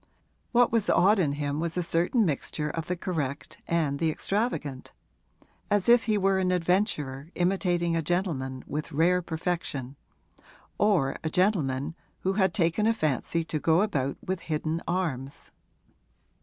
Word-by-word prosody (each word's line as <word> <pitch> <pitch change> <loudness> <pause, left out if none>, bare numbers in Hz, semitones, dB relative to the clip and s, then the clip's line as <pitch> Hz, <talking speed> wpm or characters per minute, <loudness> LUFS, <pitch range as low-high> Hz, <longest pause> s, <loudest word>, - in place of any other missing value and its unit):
What 245 0 +4
was 225 -3 +1
odd 200 +3 +5
in 150 -6 +1
him 145 0 -2
was 170 +1 -3
a 180 - +1
certain 175 +7 +2
mixture 150 -1 -2
of 165 -2 -4
the 180 - -1
correct 155 -6 -4
and 155 -4 0
the 165 - +2
extravagant: 155 - -2 0.8
as 205 -2 +1
if 235 0 +6
he 215 -2 +2
were 195 -1 +2
an 185 -1 +1
adventurer 170 - 0
imitating 175 -2 +1
a 165 - +1
gentleman 150 -7 -2
with 150 +1 -4
rare 175 +5 +3
perfection 160 -6 -3 0.8
or 180 -11 +2
a 160 - -1
gentleman 155 -7 +1 0.3
who 190 - 0
had 190 -2 +2
taken 175 +3 +1
a 225 - +3
fancy 160 - 0
to 160 -1 -3
go 165 +5 +3
about 140 -10 -1
with 185 -1 -2
hidden 160 0 -2
arms. 150 -7 -3
170 Hz, 150 wpm, -27 LUFS, 150-190 Hz, 0.8 s, if